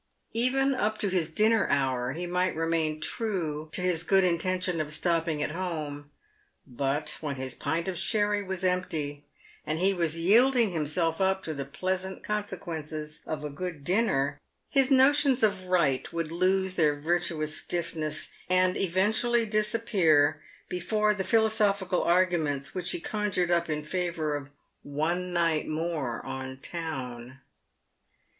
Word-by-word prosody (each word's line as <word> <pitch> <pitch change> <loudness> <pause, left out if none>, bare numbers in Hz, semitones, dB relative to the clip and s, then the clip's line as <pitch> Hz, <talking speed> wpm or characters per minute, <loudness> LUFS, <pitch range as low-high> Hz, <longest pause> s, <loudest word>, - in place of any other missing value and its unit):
Even 270 +4 +3
up 215 -4 0
to 205 - -1
his 180 -4 +1
dinner 215 +5 +3
hour 130 -2 0
he 175 +4 -4
might 180 +1 0
remain 160 -1 0
true 160 -7 -1
to - - +1
his 180 -3 +1
good 190 +2 +3
intention 180 0 +1
of 150 -1 -4
stop 165 +2 0
piug 150 -2 -1
at - - -2
home; 155 -5 -4 0.6
but 140 +3 -2
when 145 -3 -3
his 130 -1 -5
pint 170 +6 -2
of 185 -3 -2
sherry 205 -1 +2
was 190 -2 -4
empty, 160 -6 -1 0.4
and 155 +1 -2
he 190 +3 +2
was 165 -3 0
yielding 230 +5 +4
himself 165 +1 -1
up 190 0 +1
to 160 - -4
the 140 -2 -4
pleasant 185 +6 -3
consequences 160 -7 -4
of 155 -1 -4
a 150 - -3
good 165 0 -6
dinner, 145 -8 +1 0.3
his 270 -2 +3
notions 270 -1 +5
of 195 -3 +1
right 160 -8 +1
would 165 -2 -3
lose 185 +2 +1
their 150 -3 +3
virtuous 155 -1 0
stiffness, 155 -3 -3 0.2
and 185 0 +3
eventually 220 +6 +2
disappear 210 -9 +2 0.3
before 210 +4 +1
the 195 -2 -3
philosophical 205 -4 +2
arguments 170 -6 +1
which 185 -1 -3
he - - -1
conjured 200 -2 -1
up 170 -1 +1
in 150 -1 -2
favour 165 -2 -2
of 145 -1 -6 0.3
one 170 +5 -2
night 165 -3 +1
more 155 -6 -3
on 130 0 -5
town. 130 -6 -5
175 Hz, 145 wpm, -28 LUFS, 155-190 Hz, 0.6 s, notions